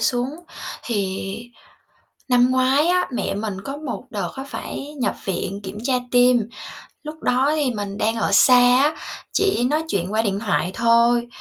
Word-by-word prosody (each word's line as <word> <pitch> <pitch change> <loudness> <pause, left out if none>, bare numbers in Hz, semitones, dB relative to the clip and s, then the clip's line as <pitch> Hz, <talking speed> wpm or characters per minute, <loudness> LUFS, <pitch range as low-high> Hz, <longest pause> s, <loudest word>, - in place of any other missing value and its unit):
xuống. 245 +1 0 0.5
Thì 195 -5 -2 1.0
năm 250 0 +4
ngoái 260 +4 +3
á, 360 +1 +2
mẹ 240 - -2
mình 205 -2 -4
có 275 +1 -5
một 295 -5 -5
đợt 205 -4 -3
á 265 - -5
phải 280 +1 -7
nhập - - 0
viện 195 0 -3
kiểm 190 +1 -7
tra 260 +1 +1 0.2
tim, 245 -2 +4 0.5
lúc 310 0 -9
đó 260 +4 +2
thì 290 -4 +1
mình 205 -1 -5
đang 225 +1 0
ở 225 - 0
xa 250 +5 +6 0.3
á, 305 +2 +1 0.4
chỉ 390 -11 +1
nói 300 +5 +1
chuyện 190 - -2
qua 220 +1 +2
điện 200 -3 -1
thoại 200 -4 0
thôi, 235 +1 +3
245 Hz, 170 wpm, -22 LUFS, 205-275 Hz, 1.0 s, xa